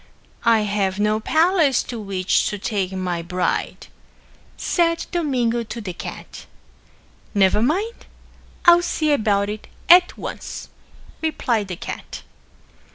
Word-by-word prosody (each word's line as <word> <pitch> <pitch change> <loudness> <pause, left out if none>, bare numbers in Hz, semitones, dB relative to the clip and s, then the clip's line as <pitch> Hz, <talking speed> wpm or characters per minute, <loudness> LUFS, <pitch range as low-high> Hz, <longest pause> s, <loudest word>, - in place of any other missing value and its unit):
"I 225 -2 +5
have 205 -2 -1
no 210 +1 +2
palace 315 - +3
to 235 - -6
which 195 -3 0
to 210 - -3
take 195 -2 -2
my 180 -2 -2
bride," 180 +2 -2 0.7
said 335 -2 +1
Domingo 255 -9 0
to 235 +1 -6
the 195 -5 -5
cat. - - -9 0.9
"Never 195 +1 +4
mind. 385 - -1 0.6
I'll 345 0 +8
see 310 -3 0
about 205 -6 +2
it 210 +1 -6 0.2
at 355 +1 +7
once," - - -7 0.5
replied 240 -9 0
the 180 - -5
cat. - - -7
220 Hz, 120 wpm, -22 LUFS, 200-315 Hz, 0.9 s, I'll